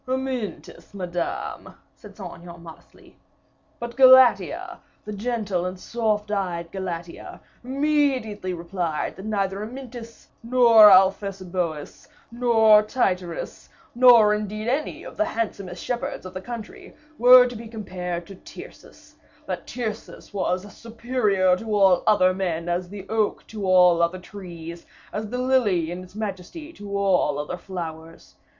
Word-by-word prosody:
"Amyntas, 260 Hz, -6 st, -5 dB
Madame," 175 Hz, -2 st, -5 dB, 0.2 s
said -, -, -15 dB
Saint -, -, -7 dB
Aignan, 170 Hz, 0 st, -12 dB
modestly. 165 Hz, 0 st, -16 dB, 0.6 s
"But 235 Hz, 0 st, -6 dB
Galatea, 260 Hz, -1 st, +5 dB, 0.3 s
the 210 Hz, -, -6 dB
gentle 205 Hz, -4 st, -2 dB
and 185 Hz, 0 st, -7 dB
soft 210 Hz, -1 st, -2 dB
eyed 175 Hz, -4 st, -3 dB
Galatea, 175 Hz, -3 st, -7 dB, 0.2 s
immediately 265 Hz, -7 st, 0 dB
replied, 170 Hz, -2 st, -3 dB
that 190 Hz, -, -10 dB
neither 200 Hz, -2 st, -2 dB
Amyntas, 235 Hz, 0 st, -9 dB
nor 230 Hz, -3 st, +7 dB
Alphesiboeus, 185 Hz, -4 st, +1 dB, 0.2 s
nor 225 Hz, -3 st, +5 dB
Tityrus, 185 Hz, -6 st, -3 dB, 0.2 s
nor 235 Hz, -4 st, +6 dB
indeed 210 Hz, +1 st, -4 dB
any 275 Hz, +5 st, -2 dB
of -, -, -11 dB
the 320 Hz, -, +2 dB
handsomest 200 Hz, -, -4 dB
shepherds 240 Hz, -5 st, -4 dB
of 185 Hz, -, -9 dB
the 185 Hz, -, -6 dB
country, 230 Hz, 0 st, -9 dB, 0.2 s
were 250 Hz, +1 st, +8 dB
to 245 Hz, -1 st, -5 dB
be 230 Hz, +1 st, -8 dB
compared 180 Hz, -6 st, -5 dB
to 195 Hz, -, -11 dB
Tyrcis; -, -, -14 dB, 0.3 s
that -, -, -5 dB
Tyrcis 220 Hz, -3 st, -6 dB
was 185 Hz, -1 st, -1 dB
as 205 Hz, -, -14 dB
superior 225 Hz, -5 st, 0 dB
to 220 Hz, +1 st, -3 dB
all 190 Hz, -3 st, +4 dB
other 185 Hz, -4 st, +4 dB
men, 175 Hz, -3 st, -3 dB
as 175 Hz, +1 st, -2 dB
the 195 Hz, -1 st, -9 dB
oak 220 Hz, -1 st, -1 dB
to 210 Hz, -3 st, -6 dB
all 180 Hz, -2 st, +5 dB
other 170 Hz, +2 st, +1 dB
trees, 175 Hz, -3 st, -10 dB, 0.3 s
as 210 Hz, 0 st, -4 dB
the 250 Hz, -, -4 dB
lily 230 Hz, -10 st, +1 dB
in 180 Hz, +1 st, -6 dB
its 185 Hz, +2 st, -16 dB
majesty 215 Hz, -, -6 dB
to 200 Hz, -6 st, -6 dB
all 185 Hz, -7 st, +1 dB
other 150 Hz, +4 st, -4 dB
flowers. 165 Hz, -3 st, -8 dB
200 Hz, 135 wpm, -23 LUFS, 180-230 Hz, 0.6 s, were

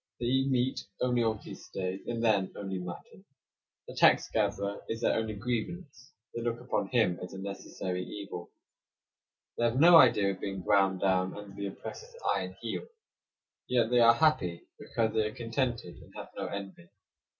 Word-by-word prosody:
They 120 Hz, -, -2 dB
eat 130 Hz, +2 st, +2 dB
meat 130 Hz, 0 st, +1 dB, 0.2 s
only 125 Hz, -1 st, +2 dB
on 110 Hz, -1 st, +1 dB
feast -, -, -11 dB
days, 95 Hz, 0 st, -3 dB
and 115 Hz, -1 st, -2 dB
then 100 Hz, -4 st, +2 dB
only 95 Hz, -2 st, -4 dB
mutton. 90 Hz, -, -9 dB, 0.6 s
The -, -, -8 dB
tax -, -, +5 dB
gatherer 100 Hz, +1 st, -1 dB
is 115 Hz, +1 st, -3 dB
their -, -, +3 dB
only 110 Hz, -1 st, -1 dB
grievance; 130 Hz, -, -4 dB, 0.2 s
they 115 Hz, -, -4 dB
look 120 Hz, 0 st, -2 dB
upon 125 Hz, +1 st, -1 dB
him 110 Hz, -8 st, +2 dB
as 90 Hz, -, -7 dB
a -, -, -7 dB
necessary 95 Hz, -2 st, -4 dB
evil. 100 Hz, -2 st, -7 dB, 1.1 s
They 120 Hz, -, +3 dB
have 120 Hz, +2 st, +1 dB
no 170 Hz, +2 st, +9 dB
idea 105 Hz, -9 st, +6 dB
of 95 Hz, -, -7 dB
being 95 Hz, -2 st, -4 dB
ground 95 Hz, -1 st, +3 dB
down 95 Hz, -1 st, +1 dB
under 105 Hz, -1 st, -9 dB
the 100 Hz, 0 st, -3 dB
oppressor's 465 Hz, -, -9 dB, 0.2 s
iron -, -, -4 dB
heel. -, -, -4 dB, 0.8 s
Yet 120 Hz, -2 st, +2 dB
they 125 Hz, -, +5 dB
are 115 Hz, 0 st, +7 dB
happy 115 Hz, -, +2 dB, 0.2 s
because 110 Hz, -1 st, -1 dB
they 110 Hz, -1 st, +2 dB
are 110 Hz, -, -8 dB
contented, 115 Hz, -5 st, -2 dB
and -, -, -15 dB
have -, -, -8 dB
no -, -, -3 dB
envy. 100 Hz, -3 st, -7 dB
110 Hz, 175 wpm, -30 LUFS, 95-120 Hz, 1.1 s, no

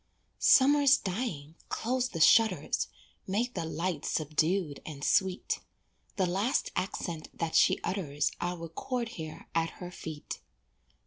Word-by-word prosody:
Summer's 280 Hz, 0 st, +6 dB
dying, 180 Hz, -, -4 dB
close 250 Hz, +2 st, 0 dB
the 165 Hz, -, -5 dB
shutters, 220 Hz, +7 st, +4 dB, 0.4 s
Make 230 Hz, +6 st, 0 dB
the 170 Hz, -3 st, -3 dB
light 165 Hz, -1 st, -2 dB
subdued 155 Hz, +1 st, 0 dB
and 145 Hz, -3 st, -8 dB
sweet, 190 Hz, +3 st, +1 dB, 0.6 s
The 190 Hz, -, +2 dB
last 195 Hz, +9 st, 0 dB
accent 170 Hz, -4 st, -3 dB
that 165 Hz, -1 st, -2 dB
she -, -, +5 dB
utters 145 Hz, -7 st, -1 dB
I'll 175 Hz, +1 st, -1 dB
record 230 Hz, +9 st, -4 dB
here 160 Hz, -9 st, -8 dB
at 165 Hz, 0 st, 0 dB
her 180 Hz, -1 st, -7 dB
feet. 155 Hz, -4 st, -7 dB
180 Hz, 125 wpm, -30 LUFS, 160-225 Hz, 0.6 s, Summer's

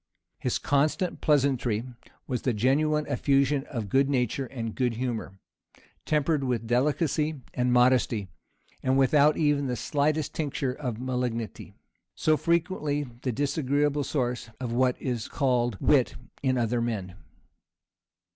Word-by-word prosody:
His -, -, 0 dB
constant 150 Hz, +6 st, 0 dB
pleasantry 130 Hz, -7 st, +2 dB, 0.4 s
was 125 Hz, -4 st, -2 dB
the 125 Hz, -, 0 dB
genuine 150 Hz, +7 st, +2 dB
effusion 140 Hz, 0 st, +1 dB
of 115 Hz, -5 st, -4 dB
good 135 Hz, +7 st, +2 dB
nature 130 Hz, 0 st, 0 dB
and 115 Hz, -3 st, -5 dB
good 125 Hz, -3 st, 0 dB
humor, 115 Hz, -5 st, -4 dB, 0.7 s
tempered 150 Hz, -1 st, +1 dB
with 125 Hz, -3 st, -1 dB
delicacy 150 Hz, +4 st, 0 dB
and 125 Hz, 0 st, +1 dB
modesty, 125 Hz, -4 st, +3 dB, 0.5 s
and 130 Hz, 0 st, +2 dB
without 145 Hz, +3 st, +4 dB
even 145 Hz, -3 st, +2 dB
the 125 Hz, -, -1 dB
slightest 150 Hz, +5 st, 0 dB
tincture 140 Hz, -4 st, -2 dB
of 125 Hz, -5 st, -4 dB
malignity, 125 Hz, -3 st, -3 dB, 0.4 s
so 155 Hz, -, +3 dB
frequently 160 Hz, -3 st, 0 dB, 0.2 s
the 130 Hz, -, -1 dB
disagreeable 145 Hz, +2 st, 0 dB
source 125 Hz, -5 st, -2 dB
of 120 Hz, -2 st, -3 dB
what 125 Hz, +1 st, +2 dB
is 120 Hz, -4 st, -3 dB
called 120 Hz, -5 st, 0 dB
wit 135 Hz, -5 st, +3 dB, 0.3 s
in 130 Hz, -2 st, +1 dB
other 120 Hz, 0 st, 0 dB
men. 105 Hz, -6 st, -3 dB
130 Hz, 125 wpm, -27 LUFS, 120-145 Hz, 0.7 s, without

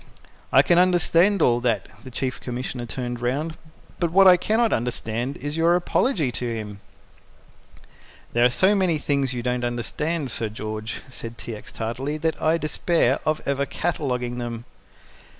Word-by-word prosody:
"I -, -, +7 dB
can 175 Hz, 0 st, +4 dB
understand 180 Hz, +2 st, +3 dB
all 120 Hz, -1 st, +4 dB
that" 115 Hz, -5 st, 0 dB, 0.2 s
the -, -, -9 dB
Chief 130 Hz, +1 st, -3 dB
Commissioner 125 Hz, 0 st, -4 dB
turned 120 Hz, 0 st, -4 dB
round 145 Hz, +6 st, -1 dB, 0.4 s
"but 170 Hz, -2 st, 0 dB
what 195 Hz, +2 st, +7 dB
I 180 Hz, -, +9 dB
cannot 220 Hz, +5 st, +1 dB
understand 120 Hz, +2 st, -2 dB
is 145 Hz, +2 st, -5 dB
your 165 Hz, +1 st, +4 dB
apology 180 Hz, -, +1 dB
to 120 Hz, 0 st, -3 dB
him." 105 Hz, -2 st, -6 dB, 1.5 s
"There 120 Hz, -, +3 dB
are 125 Hz, -, +6 dB
so 190 Hz, +11 st, +4 dB
many 185 Hz, -5 st, +2 dB
things 140 Hz, -3 st, 0 dB
you 120 Hz, -, -3 dB
don't 125 Hz, 0 st, -1 dB
understand, 135 Hz, +5 st, -2 dB
Sir 110 Hz, -1 st, 0 dB
George," 110 Hz, 0 st, -5 dB
said 115 Hz, -2 st, -8 dB
T. 115 Hz, -, -6 dB
X. 105 Hz, -, -11 dB
tartly, 130 Hz, +7 st, -3 dB
"that 160 Hz, +1 st, -2 dB
I 160 Hz, +1 st, +3 dB
despair 155 Hz, -3 st, +1 dB
of 155 Hz, 0 st, +1 dB
ever 140 Hz, 0 st, 0 dB
cataloguing 125 Hz, -7 st, -2 dB
them." 120 Hz, -1 st, -5 dB
130 Hz, 160 wpm, -24 LUFS, 120-165 Hz, 1.5 s, I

